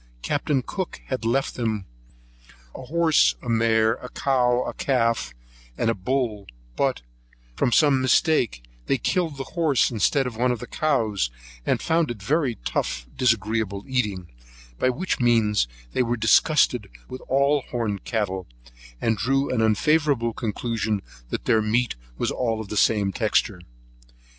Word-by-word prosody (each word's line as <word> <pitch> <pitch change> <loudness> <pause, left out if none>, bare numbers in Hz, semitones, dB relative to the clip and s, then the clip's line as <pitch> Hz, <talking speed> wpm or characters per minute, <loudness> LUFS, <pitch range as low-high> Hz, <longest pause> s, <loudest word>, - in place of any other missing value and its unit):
Capt. 145 +1 -2 0.2
Cook 190 -3 -4
had 130 -3 -3
left 135 +4 +1
with - - -12
them 110 -5 -2 0.9
a - - -8
horse 160 +2 +3
and 120 -2 -1
mare, 110 -1 +3
a 125 - -8
cow 125 -2 +1
with - - -6
calf, 115 - +1 0.5
and 115 - +1
a - - 0
bull; 110 0 -2 0.3
but, - - 0 0.5
from 120 - +1
some 140 0 +4
mistake, 130 - +2 0.2
they 135 - +2
killed 160 -1 -1
a - - -2
horse 145 -2 +1
instead 125 +5 +2
of 125 -3 -4
one 125 +2 +1
of 125 - -1
the 125 - -8
cows, 115 - 0 0.4
and - - +1
found 165 -1 +1
it 120 -3 -5
very 140 +1 +1
tough, - - -2
disagreeable 110 -4 0
eating, 105 -9 -1 0.5
by 130 - +3
which 160 +10 -2
means 110 - +3 0.3
they - - +1
were 120 0 0
disgusted 110 -1 +3 0.2
with 130 - -8
all 140 +2 +3
the - - -20
horned 110 -5 -2
cattle, 95 -5 -2 0.5
and 115 -2 0
drew 135 +3 +1
an 115 - +1
unfavourable 120 +2 +2
conclusion 110 -2 -2 0.3
that - - -4
their 110 - +3
meat 115 +3 +1 0.2
was - - -1
all 115 -3 -1
of 110 -3 -7
the - - -4
same 105 -2 +3
texture. 105 -1 0
120 Hz, 155 wpm, -24 LUFS, 110-135 Hz, 0.9 s, some